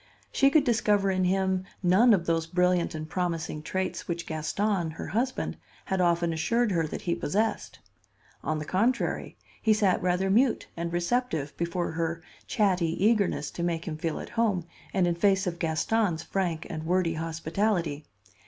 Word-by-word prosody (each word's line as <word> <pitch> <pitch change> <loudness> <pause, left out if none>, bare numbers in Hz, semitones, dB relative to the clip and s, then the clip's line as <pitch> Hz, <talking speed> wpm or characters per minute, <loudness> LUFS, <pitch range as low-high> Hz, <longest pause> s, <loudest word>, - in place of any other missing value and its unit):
She 275 - +4
could 300 0 +4
discover 210 -5 +2
in 185 -1 +1
him 190 0 +1 0.2
none 190 +7 +5
of 185 -5 +3
those 165 -1 0
brilliant 180 -1 +1
and 155 0 -5
promising 165 -3 -2
traits 185 +4 -3
which 170 -1 -3
Gaston, 170 +3 -1
her 160 - -7
husband, 255 +4 -1 0.3
had 190 -1 0
often 170 -1 +2
assured 215 +9 +1
her 165 -3 +1
that - - -6
he 170 - 0
possessed. 210 +8 -1 0.7
On 155 - -1
the 155 - -4
contrary, 225 +10 0 0.2
he 220 - +4
sat 200 -3 +2
rather 180 +2 +1
mute 240 +4 +3
and 170 0 -3
receptive 175 - -1
before 170 +1 -2
her 165 0 -2 0.2
chatty 185 -3 +1
eagerness 210 -9 +2
to - - -6
make 170 -1 -1
him 160 - -3
feel 160 0 -3
at - - -7
home 205 -7 0 0.3
and 190 -2 +2
in 175 - +2
face 195 +3 +2
of 175 -2 -3
Gaston's 165 +2 0
frank 175 -4 -2
and 155 0 -5
wordy 180 -1 +2
hospitality. 165 0 -1
180 Hz, 165 wpm, -28 LUFS, 165-200 Hz, 0.7 s, none